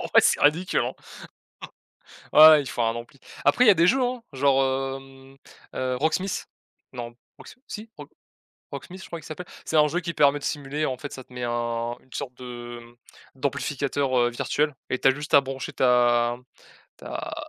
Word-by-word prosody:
Ah - - -5
ouais, - - +9
c'est - - +3
ridicule, 170 +5 +2
hein! - - -2 1.4
Ouais, 155 +1 +10
ouais 155 -2 +7
il 135 - -7
faut - - -3
un 115 0 +1
ampli. 120 +3 -9 0.3
Après 250 - +4
il - - +5
y - - +9
a - - +6
des 170 -1 +3
jeux 265 +7 +3
hein, 250 -1 -2
genre 135 0 +3 0.3
hem, 135 0 -16 0.4
heu, 130 0 -1
Rocksmith. 160 +7 -1 0.5
Non: 120 -1 -7 0.2
Rox - - -13
si? 215 +2 -8
Roc - - -10 0.6
Rocksmith, 185 +1 -9
je - - -10
crois 170 - -7
il 160 - -13
s'appelle. 170 +4 -8 0.2
C'est 160 - -1
un 150 0 +5
jeu 175 +4 -1
qui 170 -1 -5
permet 145 -1 +4
de 145 - -11
simuler 145 0 -2
en 130 - -2
fait, 145 - -7
ça 130 - -9
te - - -22
met 125 0 -6
un 120 0 -2
une 130 - -29
sorte 125 -2 -5
de 120 -1 -8
hem, 120 0 -17 0.4
d'amplificateur, 140 0 -1
heu, 120 0 +3
virtuel 145 +4 -1 0.2
et 130 - 0
tu - - +4
as - - +7
juste 150 +2 -5
à 140 - +9
brancher 135 -2 -6
ta 120 -1 +3
m 125 - -21 0.5
ta - - -6
135 Hz, 205 wpm, -25 LUFS, 125-155 Hz, 1.4 s, Ouais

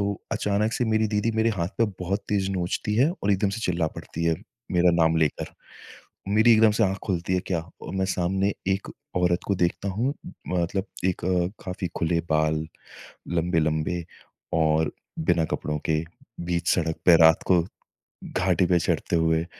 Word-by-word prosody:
तो 100 0 -2
अचानक 105 0 0
से 125 - 0
मेरी 110 0 +2
दीदी 105 +2 0
मेरे 110 +1 +3
हाथ 85 -5 -2
पे 115 - +5 0.2
बहुत 95 +3 -1
तेज़ 95 -2 0
नोचती 95 +3 -2
है 140 +7 +4
और 100 - +2
एकदम 100 +1 +1
से - - -6
चिल्ला 85 -5 0
पड़ती 85 - -5
है, 80 -1 +2 0.4
मेरा 90 0 +4
नाम 80 0 +3
लेकर। 80 -2 0 0.8
मेरी 110 +3 +5
एकदम 110 0 +6
से - - +4
आँख 95 0 -1
खुलती 90 -1 -1
है 90 - +2
क्या 85 -3 0 0.2
और - - -6
मैं 95 - +1
सामने 95 +3 0 0.2
एक 95 +1 -1 0.3
औरत 90 0 +2
को 100 - +1
देखता 85 +3 0
हूँ। 125 +9 -1 0.3
मतलब 90 +2 -1 0.2
एक 90 -2 -1
अ, 90 -1 +1 0.2
काफ़ी 90 -1 -4
खुले 85 0 +1
बाल 80 0 +1 0.7
लंबे-लंबे 80 +1 0 0.6
और 80 0 +2 0.4
बिना 85 -2 +3
कपड़ों 75 0 -2
के 80 +1 +2 0.5
बीच 85 -1 -1
सड़क 80 -2 -1
पे 85 -2 +8
रात 80 0 +6
को 90 -2 +5 0.7
घाटी 95 -1 +1
पे 90 -1 +3
चढ़ते 85 - 0
हुए। 80 0 +2
90 Hz, 170 wpm, -25 LUFS, 85-100 Hz, 0.8 s, पे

